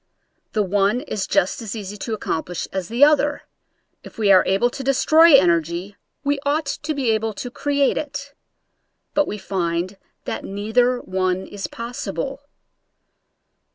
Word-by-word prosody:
The 215 - +2
one 200 +4 +1
is 215 -9 -3
just 185 - +1
as 225 -1 -5
easy 205 -2 -6
to 220 +2 -4
accomplish 175 -3 -3
as 190 -2 -3
the 235 +5 +2
other 290 -1 +4 0.3
— - - -48
if - - -13
we 210 -3 +3
are 185 - +7
able 200 +6 +2
to 270 - -6
destroy 310 +4 +6
energy 170 - +2 0.3
we 285 0 0
ought 295 +2 0
to 300 +2 -3
be 260 -5 +1
able 220 0 0
to 245 +5 -6
create 285 +1 +1
it; 285 -1 -6 0.8
but 295 -1 +2
we 210 - -4
find 185 -1 -2 0.3
that - - -4
neither 220 +5 +1
one 185 0 -1
is 205 -1 -6
possible. 235 +2 -5
220 Hz, 155 wpm, -22 LUFS, 190-280 Hz, 0.8 s, are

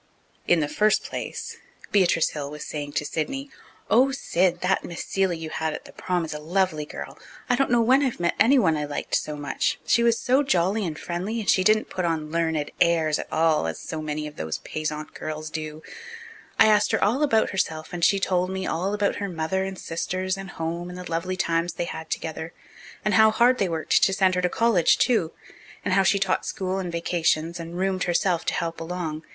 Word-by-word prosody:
In 175 -2 +4
the 150 - 0
first 215 +7 +2
place, - - -6 0.3
Beatrice 180 -5 +3
Hill 145 -2 -5
was 150 +1 -7
saying 145 -1 -5
to 150 - -1
Sidney, 270 - -3 0.4
"Oh, 255 +4 +5
Sid, 180 -9 0
that 185 +1 +1
Miss 170 - -6
Seeley 190 -3 0
you 160 -1 -6
had 160 -1 -2
at - - -9
the - - -12
prom 180 -2 -2
is 160 - -5
a 150 - -5
lovely 165 -1 0
girl. - - -8 0.3
I 245 - +3
don't 275 +2 +1
know 240 -1 +4
when 260 +4 +5
I've 265 -4 -1
met 170 0 +1
anyone 230 - +5
I 150 -1 -2
liked 145 - -5
so 150 - 0
much. 145 -2 -1
She 235 - +3
was 235 -1 +3
so 260 +3 +3
jolly 195 -5 +1
and 155 -2 -5
friendly 185 +8 -3
and 215 - -5
she 185 - +4
didn't 215 +2 +3
put 185 - -2
on 160 -3 -1
learned 160 -3 0
airs 160 -3 +3
at - - -7
all, 160 - +2
as 80 - -4
so 160 -1 -5
many 150 0 -3
of 150 0 -9
those 80 0 -3
Payzant 155 0 -5
girls 155 0 -5
do. 155 0 -6 0.7
I - - +7
asked 210 -1 +4
her 220 - +2
all 235 +8 +2
about 230 -7 +3
herself 160 -5 -2
and 175 -1 -4
she 195 +3 +4
told 185 -1 +1
me, 190 0 -3
and - - -1
all 190 +5 -1
about 205 -1 0
her 200 -1 -3
mother 175 +3 -1
and 190 0 -5
sisters 185 +3 -2
and 195 0 -8
home 170 +1 -4
and 180 - -8
the 180 -2 -8
lovely 180 +3 -2
times 165 -1 0
they 175 - -3
had 160 -1 -7
together, 160 +1 -4 0.5
and 210 - +2
how 220 0 +7
hard 240 +3 +3
they 195 - +1
worked 160 -1 +1
to 195 - +4
send 190 -1 +3
her 180 - +1
to 180 - +1
college 220 -5 +3
too, 220 -10 +2 0.5
and - - +1
how 195 - +5
she 195 +1 +3
taught 195 -1 0
school 190 0 -2
in 180 -2 -3
vacations 170 0 0
and 170 +1 -7
'roomed' 190 0 0
herself 175 0 +1
to - - 0
help 165 0 -3
along. 165 -2 -4
175 Hz, 220 wpm, -25 LUFS, 160-195 Hz, 0.7 s, I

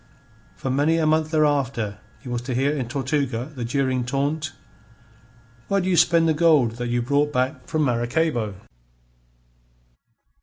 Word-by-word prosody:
For 130 - -3
many 145 +5 +2
a 160 - +1
month 155 0 +2
thereafter 140 -9 0 0.2
he - - -12
was 120 -1 -2
to 125 0 -4
hear 140 +4 +1
in 130 -5 -3
Tortuga 135 0 -2
the 125 -4 -5
jeering 130 +1 0
taunt: 145 +5 -2 1.2
"Where 200 - +1
do 185 - -2
you 185 - +2
spend 170 0 +4
the 160 - +3
gold 150 -8 +3
that 120 0 -3
you 120 0 0
brought 145 +3 +1
back 130 0 -2
from 155 -1 0
Maracaybo?" 120 -2 0
140 Hz, 150 wpm, -23 LUFS, 120-155 Hz, 1.2 s, spend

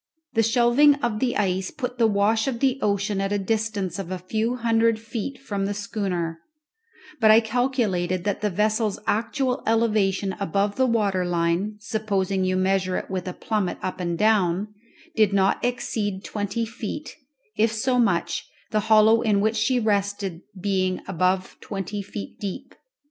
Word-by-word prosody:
The 225 - +3
shelving 240 +6 +5
of 240 -6 -2
the 245 0 0
ice 190 -2 0
put 250 -3 -5
the 230 - +5
wash 215 +2 +2
of 245 -3 -2
the 270 0 +1
ocean 200 -1 0
at 195 0 -1
a 205 - +2
distance 205 -1 -2
of 185 -3 -5
a 185 - -3
few 220 +6 -1
hundred 230 -1 +2
feet 230 +4 -5
from 200 -7 -3
the 205 - -3
schooner; 190 -5 -3 0.8
but 220 -2 +5
I 215 +1 +8
calculated 220 -7 0
that 205 -1 -1
the 210 - +1
vessel's 215 +2 0
actual 250 +4 0
elevation 210 -4 +1
above 200 +2 0
the 260 0 +2
water 205 -6 +1
line, 175 +4 0
supposing 200 -4 -1
you 185 0 +1
to 185 - +1
measure 190 -1 +1
it - - -6
with 185 -1 -3
a 180 - -3
plummet 210 -3 -2
up 185 0 -3
and 170 -2 -2
down, 210 -1 +2 0.4
did 210 -2 +3
not 195 -1 +2
exceed 220 -5 -2
twenty 205 +2 -2
feet, 230 +6 -6 0.4
if 220 +1 +2
so 250 +3 +1
much, 170 -6 0 0.2
the 215 - +2
hollow 220 +1 +6
in 210 -4 +2
which 220 +2 +1
she 235 +4 +2
rested 200 -4 -1 0.2
being 185 -1 0
above 185 +1 0
twenty 200 0 -4
feet 200 +1 -8
deep. 210 +7 -6
210 Hz, 165 wpm, -24 LUFS, 190-225 Hz, 0.8 s, I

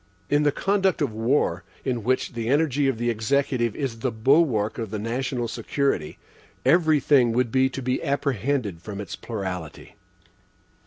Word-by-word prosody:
In 145 +1 +4
the 150 -1 +3
conduct 195 +3 +1
of 125 -6 -2
war, 110 -6 +1 0.2
in 120 -4 -1
which 130 +2 0
the 115 -1 -3
energy 145 -1 +2
of 135 -4 0
the 120 +1 0
Executive 120 0 0
is 130 -5 -3
the 130 - 0
bulwark 115 -2 +2
of 110 -3 -3
the 110 - -4
national 120 +2 -2
security, 115 - -2 0.5
every 160 -3 +4
thing 130 -5 +4
would 120 -1 +1
be 130 +1 +3
to 130 0 -6
be 125 +1 -1
apprehended 130 -8 -1
from 100 +1 -7
its 100 - -5
plurality. 95 -8 -6
125 Hz, 160 wpm, -24 LUFS, 110-140 Hz, 0.5 s, In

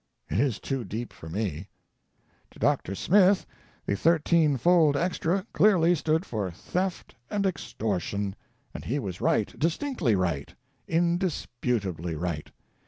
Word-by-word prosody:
It - - +1
is 130 -4 +2
too 135 -3 -3
deep 110 +4 -5
for 80 - -10
me. 95 -2 -3 0.8
To - - -18
Dr. 95 - +1
Smith, 190 - +4 0.4
the 100 - 0
"thirteen 160 - +3
fold 160 -1 +4
extra" 180 +2 0
clearly 175 -5 +5
stood 160 +1 +1
for 105 -5 -2
"theft 180 - -3 0.2
and 200 -1 0
extortion," 100 - -2 0.4
and - - -7
he 135 - -1
was 95 -10 -5
right, 105 - +1
distinctly 165 - +1
right, 85 -7 -1 0.3
indis 175 +1 +1 0.2
putably 90 -9 -1
right. 85 -4 -3
135 Hz, 130 wpm, -27 LUFS, -, 0.8 s, clearly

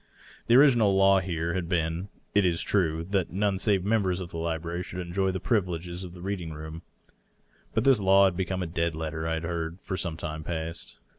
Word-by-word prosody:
The 120 - +5
original 120 -8 +6
law 95 0 +5
here 85 -2 -2
had 90 -2 -3
been, 85 +2 -1 0.2
it 100 0 +4
is 85 -2 +1
true, 80 -5 +1
that 95 -4 +1
none 100 0 0
save 100 -3 +1
members 100 -4 +1
of 90 -2 -7
the - - -6
library 85 +1 -3
should 90 0 -7
enjoy 90 +2 -1
the 95 0 -2
privileges 90 -4 -1
of 90 -1 -9
the 90 - -10
reading 95 -4 -3
room; 80 +1 -8 0.9
but 110 - +2
this 135 -4 +5
law 95 0 +6
had 95 -2 +1
become 95 0 -2
a - - -2
dead 85 0 -1
letter, 80 0 -3
I 80 - 0
had 80 - -4
heard, 85 +1 -3
for 95 - -4
some 85 -2 -3
time 80 0 -5
past. 80 0 -5
90 Hz, 210 wpm, -27 LUFS, 80-95 Hz, 0.9 s, original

